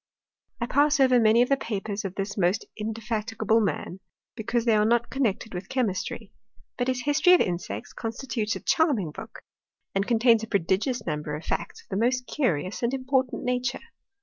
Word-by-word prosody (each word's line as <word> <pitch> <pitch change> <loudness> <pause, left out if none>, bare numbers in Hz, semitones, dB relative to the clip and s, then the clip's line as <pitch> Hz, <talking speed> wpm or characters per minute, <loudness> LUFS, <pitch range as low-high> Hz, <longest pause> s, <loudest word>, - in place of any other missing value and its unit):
I 235 - 0
pass 290 +4 +3
over 255 -2 +5
many 225 +1 +5
of 250 - -3
the 275 - +3
papers 210 -3 -4
of 195 -1 -5
this 200 +1 -3
most 185 +1 +1
inde 215 0 -4
fatigable 225 0 0
man, 190 -2 -3 0.4
because 235 +1 -1
they 230 -2 +4
are 210 - +4
not 235 +2 +2
connected 230 -4 -1
with 180 +1 -6
chemistry; 215 -3 -2 0.4
but 245 - -1
his 255 -1 -1
history 300 +5 +4
of 360 - +7
insects 170 - -3
constitutes 230 -1 -3
a - - -6
charming 255 - +2
book, - - -10 0.5
and 195 +1 0
contains 230 -1 +4
a 225 - -5
prodigious 210 - 0
number 150 -2 -3
of 155 - -8
facts - - -3
of - - -34
the 195 +4 0
most 250 +1 +1
curious 185 - -1
and 240 +2 0
important 260 -1 0
nature. 250 - -2
225 Hz, 180 wpm, -26 LUFS, 200-250 Hz, 0.5 s, of